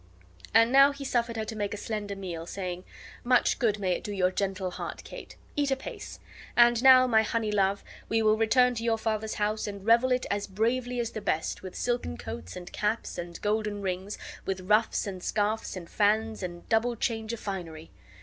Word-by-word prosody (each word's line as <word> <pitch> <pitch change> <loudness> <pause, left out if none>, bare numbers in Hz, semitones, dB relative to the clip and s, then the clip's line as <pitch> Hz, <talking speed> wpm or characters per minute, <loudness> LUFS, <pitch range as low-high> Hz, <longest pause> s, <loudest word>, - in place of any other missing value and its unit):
And 230 +2 +5
now 275 +1 +7
he 280 0 -8
suffered 235 -3 0
her 220 - -2
to 220 - -6
make 205 -1 -2
a - - -7
slender 205 -1 -4
meal, 175 -4 -6
saying: 180 -1 -5 0.4
"Much 250 0 +3
good 215 -4 +2
may 190 -3 -1
it 180 - -1
do 210 - -5
your 185 -2 +1
gentle 190 -1 -2
heart, - - -6
Kate. - - -10 0.2
Eat 290 -1 +1
apace! 270 0 -5 0.4
And 240 -1 +6
now, 260 -1 +8
my 225 -3 +4
honey 220 0 -1
love, 200 -1 +1 0.3
we 225 0 +2
will 215 0 +5
return 250 +3 +4
to 230 -1 -4
your 230 -1 +2
father's 220 -1 -2
house 215 0 -1
and 200 -1 -7
revel 235 +3 +4
it 250 0 +1
as 205 0 -1
bravely 240 +5 -1
as 235 -1 -2
the 215 - -5
best, 160 -4 -1
with 185 -1 -8
silken 240 - -2
coats 80 +3 -7
and 180 0 -9
caps 215 -1 -2
and 170 0 -6
golden 210 -1 -1
rings, 190 +2 -3 0.3
with 190 -1 -3
ruffs 210 +4 +2
and 190 -3 -6
scarfs 215 +3 -1
and 175 -2 -7
fans 220 +2 +1
and 175 -2 -6
double 235 +2 +2
change 225 0 -2
of 235 - -5
finery." 165 -5 -6
215 Hz, 200 wpm, -28 LUFS, 195-230 Hz, 0.4 s, now